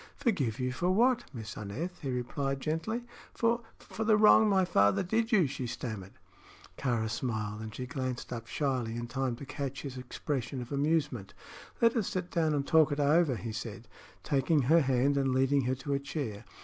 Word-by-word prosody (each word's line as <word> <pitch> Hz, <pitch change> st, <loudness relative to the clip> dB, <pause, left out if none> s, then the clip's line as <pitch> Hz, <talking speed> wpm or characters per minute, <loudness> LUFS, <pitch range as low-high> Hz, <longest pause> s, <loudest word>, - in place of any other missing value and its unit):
"Forgive 145 Hz, -, 0 dB
you 125 Hz, 0 st, 0 dB
for 175 Hz, +8 st, -1 dB
what, 240 Hz, +5 st, +3 dB
Miss 110 Hz, -6 st, -7 dB
Aneth?" 110 Hz, -, -5 dB
he 140 Hz, -, -3 dB
replied, 135 Hz, +2 st, -2 dB
gently. 165 Hz, -, -2 dB, 0.3 s
"For 235 Hz, 0 st, +2 dB, 0.2 s
for 220 Hz, -, -6 dB
the 215 Hz, -1 st, +4 dB
wrong 215 Hz, 0 st, +7 dB
my 190 Hz, -2 st, +4 dB
father 100 Hz, -, +3 dB
did 225 Hz, +5 st, 0 dB
you," 195 Hz, -7 st, +5 dB
she 135 Hz, -2 st, -4 dB
stammered. 110 Hz, -6 st, -6 dB, 0.6 s
Kāra 120 Hz, -4 st, 0 dB
smiled, 110 Hz, -2 st, -3 dB
and 110 Hz, 0 st, -7 dB
she 125 Hz, -, -4 dB
glanced 130 Hz, -1 st, -4 dB
up 115 Hz, -1 st, -6 dB
shyly 125 Hz, -4 st, -1 dB
in 120 Hz, 0 st, -3 dB
time 125 Hz, +1 st, -2 dB
to 140 Hz, -, -9 dB
catch 140 Hz, -1 st, -5 dB
his 135 Hz, -3 st, -6 dB
expression 130 Hz, +1 st, -3 dB
of 125 Hz, +1 st, -7 dB
amusement. 140 Hz, -7 st, 0 dB, 0.5 s
"Let 230 Hz, +1 st, +5 dB
us 220 Hz, -5 st, +1 dB
sit 185 Hz, -1 st, -3 dB
down 160 Hz, -3 st, +1 dB
and 140 Hz, -1 st, -1 dB
talk 160 Hz, -2 st, +5 dB
it 145 Hz, -, -1 dB
over," 145 Hz, -1 st, +4 dB
he 115 Hz, 0 st, -5 dB
said, 110 Hz, 0 st, -6 dB, 0.4 s
taking 145 Hz, +1 st, +2 dB
her 160 Hz, +6 st, +5 dB
hand 135 Hz, +1 st, +2 dB
and 135 Hz, -2 st, +1 dB
leading 135 Hz, 0 st, +3 dB
her 130 Hz, +1 st, +1 dB
to 140 Hz, +2 st, -3 dB
a 140 Hz, -, +1 dB
chair. 130 Hz, -7 st, -5 dB
135 Hz, 190 wpm, -31 LUFS, 120-165 Hz, 0.6 s, wrong